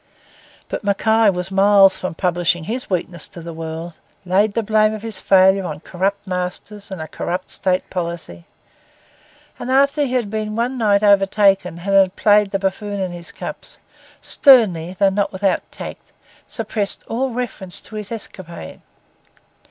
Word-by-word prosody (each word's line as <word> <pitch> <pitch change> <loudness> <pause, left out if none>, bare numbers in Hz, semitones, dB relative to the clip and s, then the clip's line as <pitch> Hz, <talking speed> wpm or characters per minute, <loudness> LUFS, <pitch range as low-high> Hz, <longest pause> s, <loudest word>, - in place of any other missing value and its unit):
But - - -5
Mackay 220 +2 +3
was 180 0 -3
miles 195 0 +5
from 185 -3 -5
publishing 175 -1 +1
his 245 +9 -4
weakness 175 -3 -3
to - - -12
the 170 0 -8
world; 160 +1 -7 0.3
laid 200 +3 +2
the 230 - +1
blame 215 0 +2
of 215 - -9
his 225 -3 -4
failure 190 0 +4
on 155 -4 -6
corrupt 195 +3 -2
masters 185 +2 -5
and 190 -3 -6
a 160 - -5
corrupt 180 +3 -4
State 185 -1 0
policy; 170 - -5 1.1
and 245 - -5
after 280 +3 +3
he 260 -3 -2
had 235 -5 -1
been 215 -1 -3
one 240 +3 -1
night 210 -4 +2
overtaken 195 -2 +3
and 200 0 +1
had 190 -1 +4
played 210 -1 +4
the 195 - -1
buffoon 200 +1 -3
in 185 -2 -2
his 175 +1 -9
cups, - - -8 0.5
sternly, 190 - +4
though 200 -1 +4
not 200 +1 -1
without 190 0 -1
tact, - - -9 0.4
suppressed 215 -3 -2
all 260 +4 -1
reference 230 -7 -5
to 215 - -11
his 210 0 -6
escapade. 185 - -8
195 Hz, 160 wpm, -20 LUFS, 180-215 Hz, 1.1 s, miles